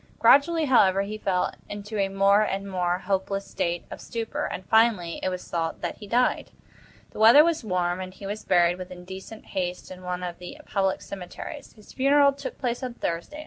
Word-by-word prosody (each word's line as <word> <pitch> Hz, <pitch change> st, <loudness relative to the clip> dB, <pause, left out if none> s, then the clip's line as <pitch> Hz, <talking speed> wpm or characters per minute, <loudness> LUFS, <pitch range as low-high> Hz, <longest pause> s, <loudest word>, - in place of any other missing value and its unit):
Gradually, 320 Hz, +3 st, +5 dB
however, 195 Hz, -8 st, +4 dB
he 215 Hz, +2 st, -6 dB
fell 185 Hz, -3 st, 0 dB, 0.2 s
into 205 Hz, +1 st, -5 dB
a 195 Hz, -, +2 dB
more 195 Hz, +1 st, +4 dB
and 195 Hz, -1 st, -2 dB
more 180 Hz, -2 st, 0 dB
hopeless 195 Hz, +1 st, -2 dB
state 170 Hz, 0 st, -2 dB
of -, -, -8 dB
stupor, 230 Hz, -1 st, -4 dB
and, 185 Hz, -, -5 dB
finally, 220 Hz, -7 st, +2 dB
it -, -, 0 dB
was 185 Hz, -1 st, -6 dB
thought 165 Hz, -1 st, -3 dB
that -, -, -4 dB
he 210 Hz, -, -10 dB
died. 245 Hz, +4 st, +1 dB, 0.6 s
The -, -, -10 dB
weather 230 Hz, +7 st, +8 dB
was 335 Hz, -4 st, 0 dB
warm, 180 Hz, -3 st, -1 dB
and 185 Hz, 0 st, -6 dB
he 195 Hz, -, -11 dB
was 210 Hz, +2 st, -5 dB
buried 175 Hz, 0 st, +3 dB
with 185 Hz, 0 st, -7 dB
indecent 190 Hz, +4 st, -10 dB
haste 180 Hz, -1 st, -3 dB
in 185 Hz, 0 st, -9 dB
one 180 Hz, 0 st, -4 dB
of 175 Hz, -1 st, -5 dB
the 180 Hz, -, -9 dB
public 195 Hz, -1 st, 0 dB
cemeteries. 200 Hz, -, -8 dB
His 215 Hz, -2 st, -16 dB
funeral 280 Hz, +1 st, +4 dB
took 280 Hz, -, -7 dB
place 245 Hz, -1 st, -2 dB
on 250 Hz, -2 st, -5 dB
Thursday. 170 Hz, -, -4 dB
195 Hz, 195 wpm, -26 LUFS, 180-225 Hz, 0.6 s, weather